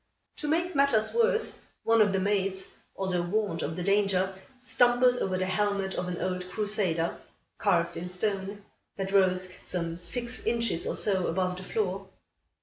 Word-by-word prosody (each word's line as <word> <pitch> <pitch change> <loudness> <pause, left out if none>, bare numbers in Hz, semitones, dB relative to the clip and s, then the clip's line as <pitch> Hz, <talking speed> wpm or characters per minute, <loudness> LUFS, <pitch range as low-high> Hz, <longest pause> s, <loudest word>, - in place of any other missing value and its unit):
To 300 - -4
make 340 +4 +1
matters 275 -7 +3
worse, 470 0 +2 0.2
one 225 0 +4
of 205 -2 +4
the 195 - +1
maids, 195 -1 0 0.3
although 185 -2 -1
warned 175 -2 -1
of 160 - -3
the 180 - -3
danger, 195 -1 +2 0.3
stumbled 250 0 +3
over 185 -4 -1
the 185 - 0
helmet 195 0 0
of 180 - -3
an 175 -1 -4
old 185 0 -3
crusader, 190 -5 -1 0.4
carved 170 -4 +2
in 180 +1 -5
stone, 200 +1 -3 0.3
that 195 -1 -3
rose 185 -1 +3
some 170 -2 -3
six 235 +8 -3
inches 230 -7 0
or - - -1
so 190 -3 +1
above 180 +1 -1
the 185 - -7
floor. 195 -1 -2
195 Hz, 160 wpm, -28 LUFS, 180-215 Hz, 0.4 s, one